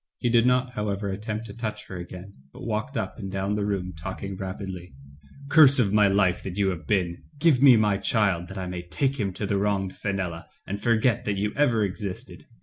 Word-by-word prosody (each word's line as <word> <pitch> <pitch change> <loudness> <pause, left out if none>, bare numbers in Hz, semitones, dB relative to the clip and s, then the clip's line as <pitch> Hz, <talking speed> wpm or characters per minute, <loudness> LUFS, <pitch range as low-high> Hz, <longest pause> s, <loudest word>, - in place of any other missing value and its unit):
He 120 - 0
did 120 0 +4
not, 125 0 +2
however, 105 -3 -2
attempt 105 +3 -4
to - - -8
touch 110 -2 -5
her 95 - -9
again, 90 +2 -8 0.2
but - - -10
walked 115 +4 -2
up 110 - -4
and 95 -3 -5
down 95 +1 -1
the 105 0 -1
room 90 -3 -2
talking 95 +3 -6
rapidly: 95 -3 -6 0.5
"Curse 140 -2 +7
of 105 -6 +3
my 105 -1 +5
life 95 -2 +2
that 95 -1 -6
you 100 -1 +2
have 90 -4 -5
been, 90 -5 0 0.2
give 145 -4 +3
me 135 -4 +8
my 105 -2 +2
child, 100 -4 +1
that 95 +2 -8
I 95 - -3
may 90 -1 -5
take 135 +10 -1
him 100 -3 0
to 105 - -4
the 100 0 0
wronged 100 -2 -1
Fenella 95 -5 -3 0.2
and 100 +1 -5
forget 115 0 +2
that 100 -1 -1
you 105 +1 -1
ever 120 -7 +3
existed. 100 -1 -5
100 Hz, 215 wpm, -26 LUFS, 95-115 Hz, 0.5 s, me